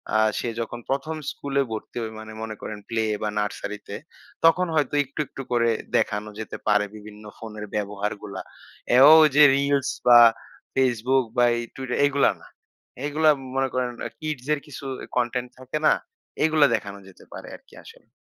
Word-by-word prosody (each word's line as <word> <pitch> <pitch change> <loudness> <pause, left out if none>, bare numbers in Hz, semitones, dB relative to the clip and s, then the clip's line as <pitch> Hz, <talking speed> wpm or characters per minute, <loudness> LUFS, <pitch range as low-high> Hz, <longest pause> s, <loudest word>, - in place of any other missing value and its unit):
আ - - +5 0.2
সে 120 - -2
যখন 115 +1 -4
প্রথম 140 +4 -2 0.2
স্কুলে 140 -1 -2
ভর্তি 110 +2 -6
হয়, 110 -1 -5
মানে 110 0 -9
মনে 110 -1 -5
করেন 105 - -6
প্লে 115 -1 0 0.2
বা 105 - -1
নার্সারিতে। 105 0 -5 0.5
তখন 180 +2 +4
হয়তো 145 -2 +1
একটু, 135 +2 -12
একটু 135 - -8
করে 115 -1 +2 0.3
দেখানো 105 +1 -1
যেতে 110 - -6
পারে 105 -1 +3
বিভিন্ন 105 0 -12
ফোনের 110 -2 -8
ব্যবহারগুলা। 105 0 -4 0.5
এও 130 +5 +8
ওই 155 - +5
যে 150 - +8
রিলস 140 0 +1 0.2
বা 120 -1 +9 0.6
Facebook 130 0 +2
বা 120 - +5
এই - - -2
Twitter 130 -2 -4
এগুলা 140 0 +3
না। - - -15 0.6
এগুলা 155 +2 +2 0.3
মনে 135 0 +1
করেন 125 -1 0 0.2
আ - - -10
কিডস 155 -5 -5
এর 150 - -1
কিছু 140 -1 -9 0.2
এ - - -9
কনটেন্ট 125 0 -1
থাকে 130 +4 -4
না? - - +6 0.5
এগুলা 155 -2 +4
দেখানো 100 -2 -6
যেতে 95 - -16
পারে - - -9
আরকি - - -19
আসলে। - - -16
125 Hz, 170 wpm, -24 LUFS, 110-140 Hz, 0.6 s, বা